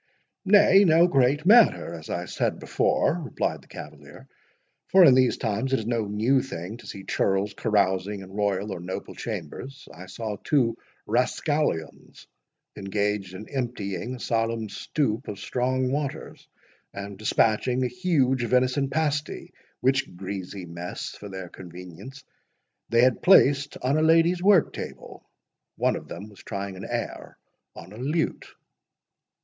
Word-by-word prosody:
"Nay, 200 Hz, 0 st, +6 dB
no 165 Hz, -1 st, +5 dB
great 140 Hz, 0 st, +2 dB
matter, 215 Hz, -, +5 dB
as 80 Hz, -2 st, -9 dB
I 85 Hz, 0 st, -3 dB
said -, -, -1 dB
before," 170 Hz, +3 st, +1 dB
replied 130 Hz, -, -2 dB
the -, -, -22 dB
cavalier; -, -, -11 dB, 0.6 s
"for 185 Hz, 0 st, +7 dB
in 135 Hz, -, +8 dB
these 130 Hz, -1 st, +3 dB
times 115 Hz, +4 st, -2 dB
it 135 Hz, -, +3 dB
is 110 Hz, -, -6 dB
no 115 Hz, -2 st, 0 dB
new 115 Hz, +6 st, +2 dB
thing 95 Hz, -3 st, -7 dB
to -, -, -14 dB
see 95 Hz, -, -8 dB
churls 100 Hz, +2 st, 0 dB
carousing 100 Hz, -1 st, 0 dB
in 95 Hz, 0 st, -11 dB
royal 100 Hz, 0 st, -1 dB
or -, -, -6 dB
noble 90 Hz, +2 st, -6 dB
chambers. 130 Hz, -, -7 dB
I 90 Hz, +4 st, -11 dB
saw 105 Hz, +2 st, -5 dB
two 120 Hz, -6 st, +2 dB, 0.3 s
rascallions 125 Hz, -, -1 dB, 0.5 s
engaged 100 Hz, -1 st, -2 dB
in 105 Hz, +3 st, -9 dB
emptying 120 Hz, -4 st, -4 dB
a -, -, -11 dB
solemn 115 Hz, -1 st, -1 dB
stoup 120 Hz, +3 st, -2 dB
of 105 Hz, -, -5 dB
strong 130 Hz, +4 st, -1 dB
waters, 140 Hz, -1 st, -4 dB, 0.4 s
and 100 Hz, 0 st, -7 dB
dispatching 115 Hz, +4 st, +1 dB
a -, -, +1 dB
huge 135 Hz, -7 st, +1 dB
venison 130 Hz, +3 st, +2 dB
pasty, 150 Hz, 0 st, -2 dB, 0.3 s
which 135 Hz, -6 st, +1 dB
greasy 95 Hz, 0 st, -6 dB
mess, 85 Hz, +1 st, -6 dB
for 100 Hz, -, -10 dB
their 95 Hz, -1 st, -7 dB
convenience, 90 Hz, -, -11 dB, 0.7 s
they 115 Hz, +1 st, +4 dB
had 130 Hz, -1 st, +3 dB
placed 145 Hz, -6 st, +5 dB
on 135 Hz, +4 st, +2 dB
a -, -, +2 dB
lady's 165 Hz, +2 st, +4 dB
work 190 Hz, -3 st, +4 dB
table—One -, -, -6 dB
of -, -, -7 dB
them 105 Hz, -, -8 dB
was 100 Hz, -, -17 dB
trying 100 Hz, -2 st, -5 dB
an 95 Hz, -, -8 dB
air -, -, -5 dB, 0.4 s
on 95 Hz, -, -11 dB
a -, -, -11 dB
lute." 150 Hz, +7 st, -2 dB
115 Hz, 145 wpm, -25 LUFS, 100-135 Hz, 0.7 s, in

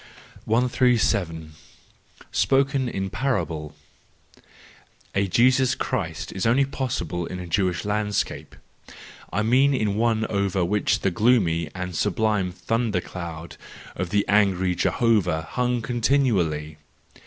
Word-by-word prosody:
137. 110 Hz, -9 st, +1 dB, 0.8 s
Spoken 135 Hz, +5 st, +2 dB
in 95 Hz, -3 st, -4 dB
Parable 80 Hz, -, -2 dB, 1.4 s
.—A 100 Hz, 0 st, +1 dB
Jesus 130 Hz, +6 st, +3 dB
Christ 80 Hz, -11 st, -3 dB
was 95 Hz, +2 st, -1 dB
only 130 Hz, +4 st, +4 dB
possible 90 Hz, -, -3 dB
in 90 Hz, -, -6 dB
a 90 Hz, -, -6 dB
Jewish 90 Hz, +1 st, 0 dB
landscape—I 105 Hz, -1 st, -4 dB
mean 135 Hz, +5 st, +3 dB
in 105 Hz, -4 st, 0 dB
one 110 Hz, -1 st, +1 dB
over 100 Hz, -4 st, 0 dB
which 105 Hz, +3 st, 0 dB
the 95 Hz, -, +1 dB
gloomy 90 Hz, -7 st, +2 dB
and 90 Hz, -1 st, -5 dB
sublime 105 Hz, 0 st, 0 dB
thunder 115 Hz, +1 st, -1 dB
cloud 85 Hz, -2 st, -8 dB, 0.4 s
of 90 Hz, 0 st, -3 dB
the 100 Hz, +2 st, +1 dB
angry 95 Hz, -3 st, +2 dB
Jehovah 90 Hz, -6 st, +1 dB
hung 125 Hz, +5 st, -1 dB
continually. 110 Hz, -, 0 dB
100 Hz, 110 wpm, -24 LUFS, 90-120 Hz, 1.4 s, only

